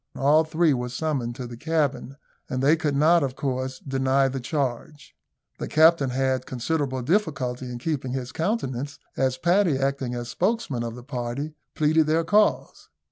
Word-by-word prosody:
All 150 Hz, +4 st, +4 dB
three 160 Hz, 0 st, +2 dB
were 125 Hz, -1 st, -2 dB
summoned 125 Hz, -3 st, -2 dB
to 125 Hz, -1 st, -6 dB
the 120 Hz, 0 st, -8 dB
cabin, 145 Hz, -1 st, -1 dB, 0.3 s
and 130 Hz, +1 st, -2 dB
they 150 Hz, +4 st, +5 dB
could 155 Hz, -3 st, -1 dB
not, 165 Hz, +4 st, +5 dB
of 130 Hz, -2 st, -2 dB
course, 130 Hz, -1 st, -3 dB
deny 135 Hz, 0 st, +1 dB
the 135 Hz, +1 st, -4 dB
charge. 140 Hz, +1 st, -4 dB, 0.4 s
The -, -, -3 dB
captain 160 Hz, -3 st, +5 dB
had 130 Hz, 0 st, 0 dB
considerable 130 Hz, 0 st, -2 dB
difficulty 130 Hz, -, -1 dB
in 120 Hz, -, -5 dB
keeping 130 Hz, -1 st, -3 dB
his 130 Hz, -1 st, -4 dB
countenance, 145 Hz, -, -2 dB, 0.2 s
as 130 Hz, -1 st, 0 dB
Paddy, 175 Hz, 0 st, +2 dB
acting 135 Hz, -2 st, -1 dB
as 120 Hz, 0 st, -5 dB
spokesman 185 Hz, -, -1 dB
of 115 Hz, -1 st, -4 dB
the 125 Hz, -, -10 dB
party, 130 Hz, +3 st, -4 dB, 0.2 s
pleaded 155 Hz, 0 st, +3 dB
their 160 Hz, +2 st, +2 dB
cause. 210 Hz, +5 st, +1 dB
135 Hz, 165 wpm, -25 LUFS, 130-155 Hz, 0.4 s, they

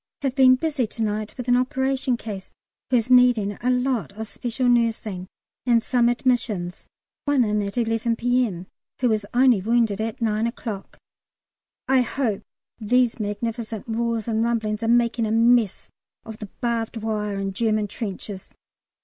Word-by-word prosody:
Have 270 Hz, -2 st, 0 dB
been 260 Hz, -2 st, +6 dB
busy 280 Hz, -3 st, -1 dB
to 225 Hz, +1 st, -4 dB
night 215 Hz, 0 st, -2 dB
with 250 Hz, -1 st, -6 dB
an 245 Hz, -, +4 dB
operation 260 Hz, 0 st, 0 dB
case 205 Hz, -5 st, -7 dB, 0.4 s
who 255 Hz, -, +4 dB
is 235 Hz, +2 st, -1 dB
needing 245 Hz, -5 st, +5 dB
a 250 Hz, -, +1 dB
lot 250 Hz, -3 st, 0 dB
of 220 Hz, +2 st, -6 dB
special 245 Hz, +3 st, -2 dB
nursing, 225 Hz, -6 st, +1 dB, 0.4 s
and 235 Hz, -2 st, +3 dB
some 240 Hz, -2 st, +2 dB
admissions 230 Hz, -8 st, -1 dB, 0.4 s
one 285 Hz, -3 st, +3 dB
in 210 Hz, -1 st, 0 dB
at 200 Hz, +3 st, -5 dB
11 230 Hz, 0 st, +1 dB
P.M., 235 Hz, -7 st, 0 dB, 0.3 s
who 250 Hz, -, +2 dB
was 215 Hz, -2 st, 0 dB
only 245 Hz, -4 st, +4 dB
wounded 225 Hz, -1 st, +1 dB
at 220 Hz, 0 st, -3 dB
9 220 Hz, -1 st, +1 dB
o'clock. 225 Hz, -4 st, -6 dB, 0.9 s
I 265 Hz, -1 st, +4 dB
hope 245 Hz, -5 st, -1 dB, 0.4 s
these 240 Hz, +2 st, +2 dB
magnificent 220 Hz, +1 st, -4 dB
roars 230 Hz, -1 st, -1 dB
and 225 Hz, -1 st, +1 dB
rumblings 220 Hz, -2 st, -1 dB
are 225 Hz, -, -1 dB
making 235 Hz, -1 st, +2 dB
a -, -, -2 dB
mess 230 Hz, -2 st, +2 dB, 0.3 s
of 220 Hz, -1 st, -9 dB
the 210 Hz, -, -7 dB
barbed 230 Hz, -1 st, -1 dB
wire 210 Hz, -2 st, -2 dB
and 195 Hz, 0 st, -3 dB
German 215 Hz, 0 st, 0 dB
trenches. 200 Hz, -2 st, -7 dB
230 Hz, 160 wpm, -23 LUFS, 215-245 Hz, 0.9 s, been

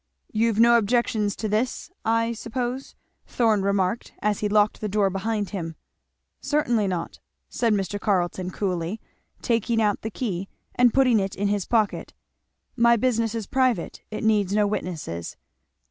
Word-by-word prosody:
"You've 225 Hz, 0 st, +1 dB
no 235 Hz, 0 st, +7 dB
objections 215 Hz, -2 st, +1 dB
to 220 Hz, -, -3 dB
this, 220 Hz, -, -1 dB
I 230 Hz, +1 st, +1 dB
suppose?" 245 Hz, +3 st, -4 dB, 0.3 s
Thorn 220 Hz, -4 st, +2 dB
remarked 200 Hz, +2 st, 0 dB
as 210 Hz, -1 st, 0 dB
he 210 Hz, -, -1 dB
locked 210 Hz, 0 st, +2 dB
the 215 Hz, -, -2 dB
door 200 Hz, -1 st, +2 dB
behind 205 Hz, +1 st, -2 dB
them. 165 Hz, -5 st, -5 dB, 0.6 s
"Certainly 240 Hz, -8 st, +1 dB
not," 180 Hz, -3 st, -4 dB, 0.3 s
said 235 Hz, -2 st, 0 dB
Mr. 205 Hz, 0 st, -1 dB
Carleton 185 Hz, -3 st, 0 dB
coolly, 185 Hz, +1 st, -2 dB, 0.4 s
taking 230 Hz, -1 st, +1 dB
out 210 Hz, -2 st, +1 dB
the 220 Hz, -, -3 dB
key 195 Hz, -5 st, -4 dB, 0.2 s
and 245 Hz, -1 st, +4 dB
putting 255 Hz, -4 st, +4 dB
it 195 Hz, -1 st, -2 dB
in 200 Hz, +1 st, 0 dB
his 205 Hz, -2 st, -1 dB
pocket; 220 Hz, -3 st, 0 dB, 0.6 s
"my 235 Hz, -1 st, +5 dB
business 230 Hz, -1 st, 0 dB
is 225 Hz, -3 st, -3 dB
private 255 Hz, -7 st, 0 dB
it 215 Hz, -, -5 dB
needs 210 Hz, -3 st, +2 dB
no 210 Hz, -1 st, +4 dB
witnesses." 160 Hz, -, -4 dB
215 Hz, 150 wpm, -24 LUFS, 195-230 Hz, 0.6 s, no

